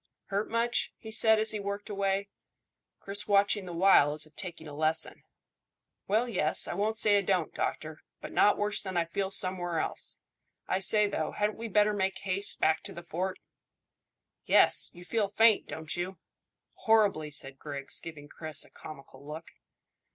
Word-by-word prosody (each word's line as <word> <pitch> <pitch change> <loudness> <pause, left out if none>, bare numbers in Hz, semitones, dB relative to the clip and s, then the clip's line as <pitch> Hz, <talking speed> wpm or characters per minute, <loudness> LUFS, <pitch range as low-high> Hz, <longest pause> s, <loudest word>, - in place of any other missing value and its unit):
"Hurt 200 +2 -1
much?" 235 +1 0
he 220 - -10
said, 220 0 +5
as 220 0 +3
he 215 - -2
worked 200 +1 -5
away, 200 -1 -1 0.7
Chris 200 +1 -2
watching 200 -1 +2
the - - -6
while 170 -5 +5
as 155 +1 -1
if 155 - -21
taking 170 -5 -8
a 145 - -9
lesson. 155 +2 +1 0.9
"Well, 220 +5 +2
yes, 180 -9 +2
I - - -3
won't 210 +4 -1
say 210 -2 +4
it 200 - -1
don't, 180 -5 +1
doctor; 155 0 -4 0.2
but - - -8
not 205 - +4
worse 205 0 0
than 190 -3 -4
I 170 - +2
feel 190 +3 -2
somewhere 185 -3 0
else. - - -3 0.5
I 185 - 0
say, 210 +2 +3
though, 160 -6 -3
hadn't 210 +1 -1
we 230 - -4
better 210 0 +3
make 190 -1 -1
haste 195 +1 -3
back 160 0 +2
to - - -4
the 170 - -9
fort?" 185 +3 -3 1.1
"Yes; - - +4
you 175 0 -12
feel 215 +1 0
faint, 220 +1 +4
don't 160 -1 -5
you?" 180 +1 -4 0.6
"Horribly," 205 -9 +2
said 135 -2 -4
Griggs, 140 -2 -5
giving 150 -3 -10
Chris 155 +1 -4
a - - -21
comical 140 -2 -12
look. 155 +3 -9
190 Hz, 175 wpm, -29 LUFS, 160-210 Hz, 1.1 s, said